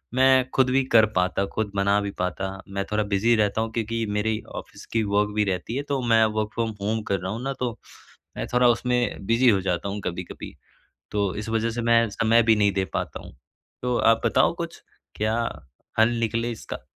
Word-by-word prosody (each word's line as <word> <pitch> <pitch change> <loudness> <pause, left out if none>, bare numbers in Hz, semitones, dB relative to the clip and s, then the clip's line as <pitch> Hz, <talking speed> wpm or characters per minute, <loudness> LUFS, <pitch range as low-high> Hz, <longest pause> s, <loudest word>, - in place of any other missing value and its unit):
मैं 130 0 +4
खुद 130 -1 +4
भी 135 0 +3
कर 110 -1 +8
पाता 90 +2 +1
खुद 110 -2 -2
बना 100 +1 +3
भी 100 - -3
पाता। 90 +1 -2 0.2
मैं 100 0 -2
थोड़ा 105 0 +1
बिज़ी 105 +3 +2
रहता 105 0 +1
हूँ 115 0 -2
क्योंकि 115 0 -2
मेरी 110 +1 0 0.2
ऑफिस - - -9
की 115 - +2
वर्क 105 0 +1
भी 105 - +3
रहती 95 +5 -3
है 140 - -1
तो 140 -2 0
मैं 115 -1 +5
वर्क 110 -1 -1
फ्रॉम 115 -1 -1
होम 110 +2 -1
कर 100 -2 +1
रहा 95 +2 -4
हूँ 115 - -4
ना 135 0 -2
तो 125 -2 -1 0.7
मैं - - -2
थोड़ा 125 0 +5
उसमें 120 -3 0
बिज़ी 120 +2 +4
हो 100 -3 +3
जाता 90 +1 -2
हूँ 100 +1 -4
कभी-कभी। 90 0 -6 0.6
तो 100 -3 0
इस 105 +1 -5
वजह 115 +1 0
से 120 +1 -3
मैं 115 -1 +4
समय 115 +2 +3
भी 110 -1 +4
नहीं 100 -1 +3
दे 95 0 0
पाता - - -3
हूँ, - - -12 0.5
तो 125 -1 0
आप 115 0 +3
बताओ - - +3
कुछ - - -6 0.3
क्या 110 +1 0 0.6
हल 110 +1 +5
निकले 115 +1 -1
इसका? 110 - -8
110 Hz, 210 wpm, -24 LUFS, 100-115 Hz, 0.7 s, कर